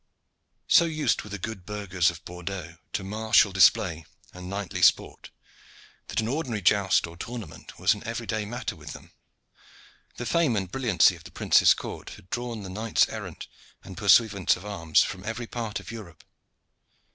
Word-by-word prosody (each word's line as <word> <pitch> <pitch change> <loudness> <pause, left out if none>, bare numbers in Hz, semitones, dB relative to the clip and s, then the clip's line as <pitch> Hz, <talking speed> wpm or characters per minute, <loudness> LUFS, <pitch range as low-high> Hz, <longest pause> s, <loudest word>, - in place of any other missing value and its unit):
So 170 - +6
used 155 -2 0
were 105 - -11
the 105 - -5
good 100 0 -6
burghers 95 -3 0
of 85 -2 -9
Bordeaux 90 -1 -7 0.2
to 95 0 -2
martial 110 +1 +3
display 90 -3 +4 0.3
and 90 0 -9
knightly 100 -1 -4
sport, - - +2 0.8
that - - -2
an 110 - -1
ordinary 125 -6 -2
joust 100 -2 +3
or 85 0 -11
tournament 115 +4 -8
was - - +3
an 105 - -9
everyday 115 -2 -3
matter 120 -1 -5
with 75 -1 -9
them. - - -13 1.1
The 120 - -5
fame 160 -4 +2
and 95 -3 -2
brilliancy 120 -7 +3
of - - -15
the - - -11
prince's - - +4
court - - -7
had 90 - -19
drawn 120 -3 -4
the - - -7
knights 110 +3 +1
errant - - -7 0.4
and - - -10
pursuivants 100 -5 +4
of 90 - -11
arms 85 -7 +2
from 95 0 -6
every 110 +3 -4
part 115 -2 -4
of - - -10
Europe. 105 -8 -10
105 Hz, 170 wpm, -26 LUFS, 90-115 Hz, 1.1 s, So